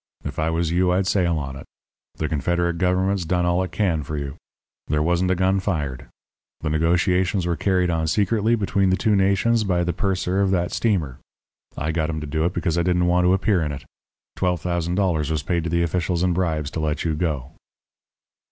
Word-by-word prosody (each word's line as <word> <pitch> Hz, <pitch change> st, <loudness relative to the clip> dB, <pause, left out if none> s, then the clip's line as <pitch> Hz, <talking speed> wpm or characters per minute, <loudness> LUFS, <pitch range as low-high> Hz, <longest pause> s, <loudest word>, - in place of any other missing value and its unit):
If -, -, -4 dB
I 80 Hz, +1 st, +1 dB
was 80 Hz, 0 st, 0 dB
you, 90 Hz, +1 st, +2 dB
I'd 95 Hz, +2 st, +1 dB
sail 90 Hz, -4 st, +1 dB
on 70 Hz, -2 st, -4 dB
it. 70 Hz, -, -10 dB, 0.5 s
The 80 Hz, -, -2 dB
Confederate 85 Hz, +3 st, 0 dB
Government's 95 Hz, +1 st, +1 dB
done 90 Hz, +1 st, 0 dB
all 90 Hz, +1 st, +2 dB
it 95 Hz, -, -3 dB
can 90 Hz, -7 st, 0 dB
for 75 Hz, +1 st, -5 dB
you. 70 Hz, -1 st, -4 dB, 0.5 s
There 75 Hz, 0 st, +1 dB
wasn't 85 Hz, +2 st, +1 dB
a 95 Hz, -, +2 dB
gun 95 Hz, +2 st, +2 dB
fired. 75 Hz, -10 st, -3 dB, 0.5 s
The 75 Hz, -, -2 dB
negotiations 90 Hz, +3 st, +1 dB
were 85 Hz, -1 st, 0 dB
carried 90 Hz, +1 st, +1 dB
on 80 Hz, -1 st, 0 dB
secretly 105 Hz, +5 st, +2 dB
between 100 Hz, -3 st, +1 dB
the 95 Hz, -, +2 dB
two 105 Hz, 0 st, +2 dB
nations 100 Hz, +4 st, +2 dB
by 90 Hz, -3 st, +1 dB
the 85 Hz, 0 st, -1 dB
purser 95 Hz, +1 st, 0 dB
of 100 Hz, -, +2 dB
that 90 Hz, -2 st, 0 dB
steamer. 85 Hz, -, -1 dB, 0.6 s
I 75 Hz, +3 st, -1 dB
got 80 Hz, -1 st, -1 dB
him 80 Hz, -1 st, -2 dB
to 75 Hz, -, -5 dB
do 80 Hz, +2 st, -1 dB
it 90 Hz, -, 0 dB
because 85 Hz, -1 st, 0 dB
I -, -, +3 dB
didn't 90 Hz, 0 st, +2 dB
want 90 Hz, 0 st, +3 dB
to 90 Hz, -, +4 dB
appear 95 Hz, -1 st, +1 dB
in 75 Hz, -2 st, -1 dB
it. 70 Hz, -, -7 dB, 0.5 s
Twelve 90 Hz, -1 st, 0 dB
thousand 85 Hz, +1 st, -2 dB
dollars 85 Hz, -7 st, +1 dB
was 80 Hz, -1 st, -1 dB
paid 85 Hz, -2 st, -1 dB
to -, -, -1 dB
the 85 Hz, +1 st, +1 dB
officials 85 Hz, +1 st, -1 dB
in 90 Hz, -1 st, +2 dB
bribes 80 Hz, -4 st, -1 dB
to -, -, -4 dB
let 75 Hz, -1 st, -1 dB
you 80 Hz, -, 0 dB
go.' 75 Hz, -4 st, -2 dB
85 Hz, 215 wpm, -23 LUFS, 80-95 Hz, 0.6 s, to